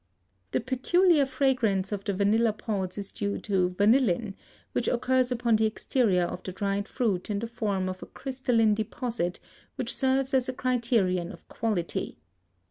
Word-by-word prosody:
The - - 0
peculiar 285 +5 +3
fragrance 250 -8 +1
of 200 -1 -3
the 200 - 0
vanilla 215 +3 +3
pods 200 -4 -3
is 200 -1 -5
due 200 -1 -2
to 190 -4 +1
vanillin, 215 -2 +3 0.4
which - - -1
occurs 255 +1 +2
upon 235 -2 +2
the 220 0 +3
exterior 215 -4 +1
of 180 +1 -4
the 185 - -6
dried 200 +2 -2
fruit 210 -8 -1
in 205 - -1
the 220 - -3
form 205 -5 -2
of 185 0 -5
a - - -8
crystalline 250 -5 +1
deposit, 215 -3 -2 0.4
which - - -2
serves 265 0 +1
as 260 -1 +2
a - - -2
criterion 230 -9 0
of - - -14
quality. 210 -7 -2
220 Hz, 160 wpm, -27 LUFS, 195-255 Hz, 0.4 s, peculiar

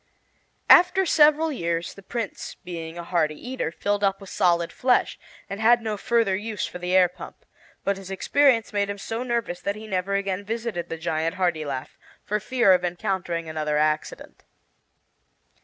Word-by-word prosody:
After 365 +2 +6
several 310 0 +4
years, 170 - -2
the 195 - -13
Prince, 225 +1 -5
being 165 -2 -8
a 170 - -5
hearty 160 -3 0
eater, 250 -3 -4
filled 205 +4 -1
up 195 -1 +2
with 195 -2 -11
solid 170 -1 +1
flesh, 250 -1 +1 0.3
and 200 - -6
had 235 +2 +5
no 215 -1 -2
further 230 -2 +1
use 210 +1 -3
for 180 - -8
the 180 +1 -1
air 185 -1 +6
pump; 180 - -12 0.4
but 200 0 0
his 195 -1 -10
experience 235 +4 +2
had - - -29
made 200 -1 0
him 200 - -4
so 225 +4 -4
nervous 235 -8 -2
that 200 - -2
he 215 +1 -9
never 195 -1 -1
again 200 0 -2
visited 220 -5 -4
the 165 - -4
giant 160 0 -2
Hartilaf, 155 -8 -2 0.2
for 210 +1 -1
fear 225 -2 +3
of 180 -1 +2
encountering 175 -1 -2
another 155 -1 -1
accident. 155 0 -2
195 Hz, 175 wpm, -24 LUFS, 170-225 Hz, 0.4 s, After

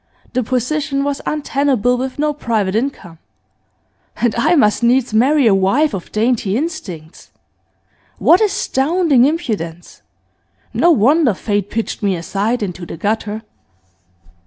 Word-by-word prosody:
The 255 - +1
position 275 +4 -1
was 285 -1 -2
untenable 275 -5 0
with 255 +1 -4
no 300 0 0
private 220 -9 -1
income. 215 - -3 1.0
And 240 -2 +1
I 235 +9 +2
must 210 -8 +3
needs 245 0 +2
marry 270 +5 +3
a 220 - +5
wife 215 +10 +2
of 190 -3 -6
dainty 220 -2 0
instincts! 205 - -6 0.9
What 355 - +4
astounding 330 - +2
impudence! 205 - -3 0.7
No 345 - +3
wonder 280 - +3
Fate 205 0 -2
pitched 225 0 -3
me 200 -3 +1
aside 205 +7 -2
into 180 -2 -5
the 170 - -7
gutter. 215 +3 -2
240 Hz, 125 wpm, -17 LUFS, 205-285 Hz, 1.0 s, a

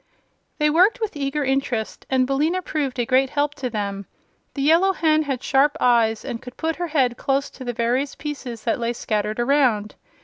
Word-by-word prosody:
They 300 -1 +2
worked 375 +10 +4
with 440 -6 -3
eager 285 +1 -2
interest, 265 -5 -2
and 260 -1 +2
Billina 305 +8 0
proved 280 -6 -2
a 240 - 0
great 260 +2 +3
help 290 0 0
to 255 -3 -4
them. 200 -3 -4 0.5
The 275 - -2
Yellow 340 +6 +4
Hen 310 -3 +2
had 270 -4 -3
sharp 280 +2 +2
eyes 230 -3 +2
and 230 - -5
could 250 -1 -11
put 325 0 -2
her 350 0 -2
head 260 -6 +1
close 275 +1 -1
to 260 - -10
the 245 -1 -3
various 245 +4 -1
pieces 275 -6 -6
that 230 - 0
lay 235 0 -1
scattered 215 -1 -2
around. 240 -5 +2
270 Hz, 195 wpm, -22 LUFS, 240-300 Hz, 0.5 s, worked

